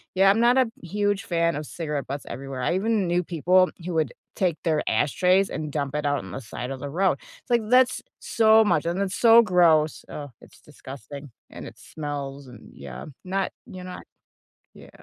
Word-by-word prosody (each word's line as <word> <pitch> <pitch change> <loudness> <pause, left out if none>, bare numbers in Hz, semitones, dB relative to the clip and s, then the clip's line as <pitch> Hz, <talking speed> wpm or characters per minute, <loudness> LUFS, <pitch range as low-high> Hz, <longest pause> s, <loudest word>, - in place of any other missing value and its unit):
yeah, 195 +1 +5
I'm 205 +3 +3
not 240 +2 +4
a 260 -2 +4 0.2
huge 205 +3 -1
fan 170 -2 0
of 150 0 -5
cigarette 150 -4 -4
butts 140 +1 -5
everywhere. 135 +1 -6
I 170 - 0
even 205 0 0
knew 175 +1 +1
people 180 +3 +3 0.2
who 180 - -3
would 155 -6 0 0.2
take 180 -5 0
their 155 -2 +1
ashtrays 185 +6 +2
and 150 -2 -4
dump 140 -2 -3
it 150 -1 -1
out 145 0 +1
on 95 -2 -9
the 135 - -6
side 125 +2 -7
of 135 - -6
the 140 +1 -6
road. 175 -2 +1
It's, - - -16
like, 235 -1 +4
that's 255 +1 +4 0.2
so 220 0 +4
much, 170 -5 +2
and 175 +3 -1
it's 195 -1 -1
so 230 0 +7
gross. 165 -6 +3
Oh, 145 -3 -7
it's - - -18
disgusting, 140 0 -11 0.2
and - - -9
it - - -12
smells, 145 -2 -6
and, 120 -3 -14
yeah, 65 -3 -9 0.2
not 190 +1 -2 0.2
you're 185 -1 -9
not 180 0 -8 0.7
Yeah. - - -15
170 Hz, 200 wpm, -24 LUFS, 145-195 Hz, 0.7 s, so